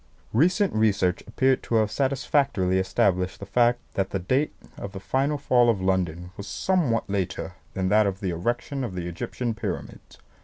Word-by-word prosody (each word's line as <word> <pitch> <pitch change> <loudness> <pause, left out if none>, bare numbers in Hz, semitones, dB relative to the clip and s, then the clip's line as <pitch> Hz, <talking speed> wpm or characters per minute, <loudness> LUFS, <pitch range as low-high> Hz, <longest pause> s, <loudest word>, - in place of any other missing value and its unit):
Recent 180 - +3
research 100 -4 +2
appeared 130 +4 +2
to 115 - -2
have 110 -2 +3
satisfactorily 135 -7 +1
established 95 -1 +1
the 100 - -7
fact 120 +3 +2
that 95 -1 -1
the - - -1
date 130 +11 0 0.2
of 100 - -7
the 95 - -6
final 135 +8 0
fall 125 -3 +3
of 110 -4 +2
London 90 -2 -1
was 100 - -7
somewhat 155 - 0
later 95 -1 -2 0.2
than 95 -1 0
that 105 +1 +4
of 95 -1 -3
the 95 -4 -2
erection 120 - -2
of 105 -7 -4
the 90 -1 -3
Egyptian 115 +7 -3
Pyramids. 110 -5 -6
105 Hz, 170 wpm, -25 LUFS, 95-130 Hz, 0.2 s, that